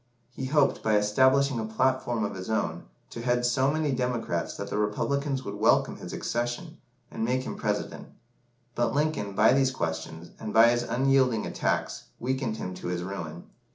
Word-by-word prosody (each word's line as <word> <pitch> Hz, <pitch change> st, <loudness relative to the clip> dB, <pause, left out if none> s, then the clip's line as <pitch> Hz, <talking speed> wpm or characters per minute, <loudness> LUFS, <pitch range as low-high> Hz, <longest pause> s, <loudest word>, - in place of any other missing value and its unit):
He 130 Hz, -, -5 dB
hoped, 145 Hz, 0 st, +2 dB
by 110 Hz, -1 st, +3 dB
establishing 130 Hz, +5 st, +3 dB
a 110 Hz, -, -2 dB
"platform" 120 Hz, 0 st, 0 dB
of -, -, -4 dB
his 95 Hz, +1 st, -7 dB
own, 85 Hz, -6 st, -1 dB, 0.3 s
to 115 Hz, -, -6 dB
head 120 Hz, 0 st, +1 dB
so 130 Hz, +2 st, +2 dB
many 155 Hz, -1 st, 0 dB
Democrats 125 Hz, -9 st, -2 dB
that 100 Hz, 0 st, -6 dB
the 105 Hz, -, -1 dB
Republicans 135 Hz, +6 st, -1 dB
would -, -, -4 dB
welcome -, -, +2 dB
his -, -, -8 dB
accession, 120 Hz, 0 st, -3 dB, 0.3 s
and -, -, -3 dB
make 130 Hz, +3 st, 0 dB
him -, -, -5 dB
President. -, -, -3 dB, 0.7 s
But 120 Hz, 0 st, 0 dB
Lincoln, 145 Hz, -9 st, 0 dB
by 110 Hz, +5 st, +5 dB
these 135 Hz, -1 st, +3 dB
questions, 80 Hz, -6 st, -4 dB
and 110 Hz, -1 st, -5 dB
by 115 Hz, +1 st, +8 dB
his 120 Hz, 0 st, +1 dB
unyielding 130 Hz, -2 st, +2 dB
attacks, -, -, -2 dB
weakened 125 Hz, -2 st, -2 dB
him 90 Hz, -, -5 dB
to 90 Hz, -, -7 dB
his 90 Hz, 0 st, -2 dB
ruin. 85 Hz, -3 st, -6 dB
120 Hz, 175 wpm, -27 LUFS, 105-130 Hz, 0.7 s, by